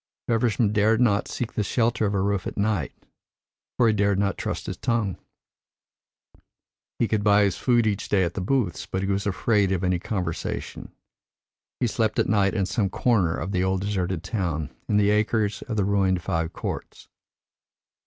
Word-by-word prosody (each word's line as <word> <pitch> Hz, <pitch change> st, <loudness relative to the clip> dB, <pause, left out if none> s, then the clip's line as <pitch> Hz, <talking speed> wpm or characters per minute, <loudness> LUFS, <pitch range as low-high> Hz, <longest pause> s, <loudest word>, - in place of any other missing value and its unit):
Feversham 115 Hz, -2 st, +1 dB
dared 110 Hz, +1 st, +3 dB
not 105 Hz, -5 st, +2 dB
seek 120 Hz, -1 st, -4 dB
the 110 Hz, -, 0 dB
shelter 115 Hz, +1 st, +1 dB
of 100 Hz, -, -1 dB
a 95 Hz, -, +1 dB
roof 100 Hz, -1 st, -1 dB
at -, -, -6 dB
night, 100 Hz, -, 0 dB, 0.9 s
for 120 Hz, -, +4 dB
he 110 Hz, -, +4 dB
dared 100 Hz, -1 st, +2 dB
not 100 Hz, 0 st, +1 dB
trust -, -, -4 dB
his -, -, -4 dB
tongue. 115 Hz, -5 st, -1 dB, 1.8 s
He 115 Hz, -, +1 dB
could 110 Hz, -2 st, 0 dB
buy 105 Hz, 0 st, +5 dB
his 100 Hz, -4 st, +1 dB
food 120 Hz, -2 st, +2 dB
each 105 Hz, -2 st, -1 dB
day 95 Hz, -2 st, +3 dB
at 85 Hz, -1 st, -1 dB
the 95 Hz, -, -3 dB
booths, 105 Hz, -3 st, -1 dB
but 95 Hz, +1 st, -2 dB
he 95 Hz, -, -1 dB
was 100 Hz, +1 st, -1 dB
afraid 100 Hz, 0 st, +1 dB
of 95 Hz, -1 st, -1 dB
any 90 Hz, -1 st, +1 dB
conversation. 90 Hz, -4 st, -4 dB, 0.9 s
He 125 Hz, -, +1 dB
slept 110 Hz, -1 st, 0 dB
at -, -, +2 dB
night 100 Hz, -1 st, +2 dB
in 100 Hz, -3 st, +1 dB
some 100 Hz, 0 st, 0 dB
corner 95 Hz, -5 st, +1 dB
of 90 Hz, +4 st, -4 dB
the 90 Hz, -2 st, +1 dB
old 95 Hz, 0 st, 0 dB
deserted 95 Hz, -4 st, -2 dB
town, 85 Hz, -7 st, -2 dB, 0.2 s
in 105 Hz, -, +3 dB
the 105 Hz, 0 st, +4 dB
acres 105 Hz, -1 st, +1 dB
of 110 Hz, -3 st, -3 dB
the 100 Hz, -, +2 dB
ruined 95 Hz, -3 st, +1 dB
fives 80 Hz, -1 st, -1 dB
courts. -, -, -6 dB
100 Hz, 185 wpm, -25 LUFS, 95-110 Hz, 1.8 s, buy